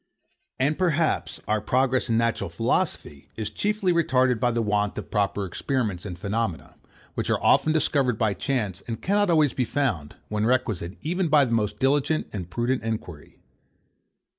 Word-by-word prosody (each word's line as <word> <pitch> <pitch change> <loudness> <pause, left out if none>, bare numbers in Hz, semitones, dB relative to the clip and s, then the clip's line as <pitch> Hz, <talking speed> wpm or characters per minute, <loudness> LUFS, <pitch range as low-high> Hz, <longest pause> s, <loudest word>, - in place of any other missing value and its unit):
And, 140 +5 +1
perhaps, 170 -3 +1
our 110 0 +1
progress 130 +2 +1
in 115 - +2
natural 115 -1 0
philosophy 70 -1 -2
is 110 -1 -4
chiefly 205 - 0
retarded 130 -7 +2
by 125 - +2
the 115 -1 0
want 105 -1 0
of - - -6
proper 100 -1 0
experiments 105 -2 -2
and 90 -3 -6
phaenomena, 100 -1 -3 0.4
which - - -3
are - - +2
often 155 - +4
discovered 140 -6 +1
by 110 -3 +1
chance, 105 -7 -2
and 115 -2 -4
cannot 205 +1 +1
always 155 -5 +4
be 130 - 0
found, 115 - -2
when 105 0 -1
requisite, 110 -8 -1
even 175 +3 0
by 150 -2 +5
the 120 - -4
most 105 -2 0
diligent 145 +4 +1
and 90 -4 -5
prudent 120 +6 -1
enquiry. 110 -9 -6
120 Hz, 165 wpm, -25 LUFS, 105-145 Hz, 0.4 s, by